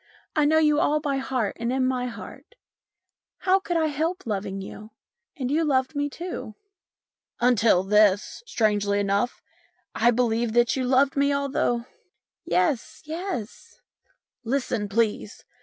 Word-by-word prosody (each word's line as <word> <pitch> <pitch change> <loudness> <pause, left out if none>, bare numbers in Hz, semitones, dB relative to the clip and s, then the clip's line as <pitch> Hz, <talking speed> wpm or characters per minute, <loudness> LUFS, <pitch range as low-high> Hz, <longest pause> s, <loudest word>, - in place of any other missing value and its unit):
I 300 -2 +3
know 315 +2 +4
you 300 -1 +4
all 305 +1 +2
by 285 -2 -1
heart 255 -6 -2
and 235 +1 -1
in 260 0 +1
my 255 -1 0
heart. 250 - -10 0.8
How 380 +1 +3
could 350 -3 -2
I 320 - +2
help 320 +5 -2
loving 195 -3 -3
you? 210 +2 -9 0.5
And 260 -2 -2
you 320 +3 +2
loved 270 -1 +1
me 290 0 0
too." 335 - -7 0.4
" - - -59
Until 230 -6 +4
this, 205 0 +3
strangely 205 - +1
enough, 200 +4 -1 0.5
I 235 - +3
believed 235 -1 +1
that 240 0 +3
you 260 -1 -1
loved 265 +2 +3
me, 280 0 +2
although 275 -4 0 0.3
" - - -58 0.3
"Yes, 180 +8 0
yes." 320 - -6 0.6
"Listen, 235 -4 -1
please. 215 0 -1
250 Hz, 145 wpm, -25 LUFS, 215-290 Hz, 0.8 s, know